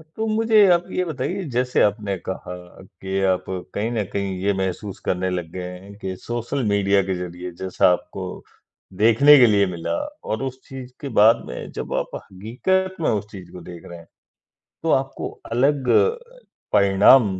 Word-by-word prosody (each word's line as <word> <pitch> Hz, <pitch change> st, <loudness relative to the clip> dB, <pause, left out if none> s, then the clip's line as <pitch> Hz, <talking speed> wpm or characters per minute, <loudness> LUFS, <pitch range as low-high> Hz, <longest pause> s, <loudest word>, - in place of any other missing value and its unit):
तो 220 Hz, -, -2 dB
मुझे 220 Hz, -1 st, +4 dB
आप 175 Hz, 0 st, +3 dB
ये 185 Hz, -, 0 dB
बताइए 160 Hz, +5 st, -3 dB
जैसे 125 Hz, 0 st, +1 dB
आपने 105 Hz, -1 st, 0 dB
कहा 90 Hz, -1 st, -5 dB, 0.3 s
कि 95 Hz, +1 st, -5 dB
आप 90 Hz, -, -2 dB, 0.3 s
कहीं 105 Hz, +3 st, -1 dB
न 115 Hz, -3 st, 0 dB
कहीं 100 Hz, -2 st, -2 dB
ये 100 Hz, +1 st, +2 dB
महसूस 95 Hz, +1 st, -4 dB
करने 95 Hz, +1 st, 0 dB
लग 90 Hz, -3 st, -3 dB
गए 90 Hz, 0 st, -6 dB, 0.2 s
हैं 100 Hz, +2 st, -13 dB
कि, 95 Hz, -2 st, -5 dB
सोशल 120 Hz, +7 st, -3 dB
मीडिया 100 Hz, -1 st, +3 dB
के 95 Hz, 0 st, -2 dB
ज़रिए 90 Hz, 0 st, -6 dB
जैसा 95 Hz, -1 st, +3 dB
आपको -, -, -6 dB, 0.5 s
देखने 115 Hz, +8 st, +7 dB
के 125 Hz, -, +8 dB
लिए 100 Hz, -2 st, +4 dB
मिला 85 Hz, -2 st, -3 dB, 0.3 s
और 110 Hz, +4 st, -2 dB
उस 130 Hz, -1 st, -5 dB
चीज़ 130 Hz, -1 st, -9 dB
के 140 Hz, -, -4 dB
बाद 110 Hz, +2 st, +6 dB
में 60 Hz, -, -7 dB
जब -, -, -5 dB
आप -, -, -1 dB
हकीकत 130 Hz, -, -2 dB
में -, -, +2 dB
उस 105 Hz, -1 st, -1 dB
चीज़ 95 Hz, -3 st, -11 dB
को 90 Hz, -, -10 dB
देख 85 Hz, 0 st, -10 dB
रहे 85 Hz, -, -9 dB
हैं, 85 Hz, 0 st, -15 dB, 0.8 s
तो -, -, 0 dB
आपको -, -, -1 dB, 0.2 s
अलग 135 Hz, +2 st, +1 dB, 0.8 s
परिणाम 100 Hz, +5 st, +6 dB
105 Hz, 170 wpm, -22 LUFS, 95-130 Hz, 0.8 s, के